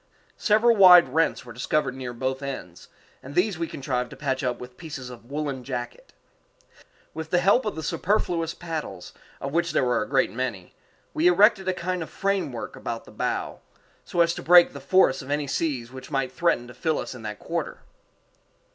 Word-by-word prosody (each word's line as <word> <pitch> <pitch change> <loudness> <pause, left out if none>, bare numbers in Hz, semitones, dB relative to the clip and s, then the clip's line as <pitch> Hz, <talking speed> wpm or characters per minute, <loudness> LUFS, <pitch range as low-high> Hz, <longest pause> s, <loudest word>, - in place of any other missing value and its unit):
Several 225 +2 +4
wide 180 -7 +8
rents 160 +1 0
were 120 - -10
discovered 125 +3 0
near 130 -2 -6
both 130 +2 -3
ends, 130 -11 -7 0.3
and 140 +3 -10
these 180 -1 +1
we 165 - -1
contrived 125 -4 -3
to - - -10
patch 135 -3 -2
up 125 -1 -1
with 125 0 -10
pieces 145 -5 -8
of 120 -1 -12
woollen 140 -3 -3
jacket. 120 -2 -6 1.0
With 160 0 -6
the 180 - +2
help 200 +8 +3
of 210 - -2
the 160 - -5
superfluous 165 -1 0
paddles, 155 - -6 0.3
of 140 +1 -5
which 170 0 0
there - - +2
were 125 -2 +1
a 105 - -4
great 135 -1 +2
many, 115 -6 -4 0.4
we 160 +3 +3
erected 190 +2 +5
a 185 - +2
kind 180 0 -3
of 160 - -5
framework 195 -11 -2
about 115 -1 -5
the - - -14
bow, - - -3 0.4
so 175 - 0
as 170 0 +3
to - - -6
break 175 +1 +6
the 140 - -7
force 140 -1 +3
of 130 - -11
any 145 0 0
seas 135 -4 -2
which 130 0 -10
might 135 -3 -1
threaten 170 -5 +1
to 125 - -11
fill 160 +2 -1
us - - -5
in 125 - -10
that 105 -1 -6
quarter. - - -4
145 Hz, 195 wpm, -25 LUFS, 125-175 Hz, 1.0 s, wide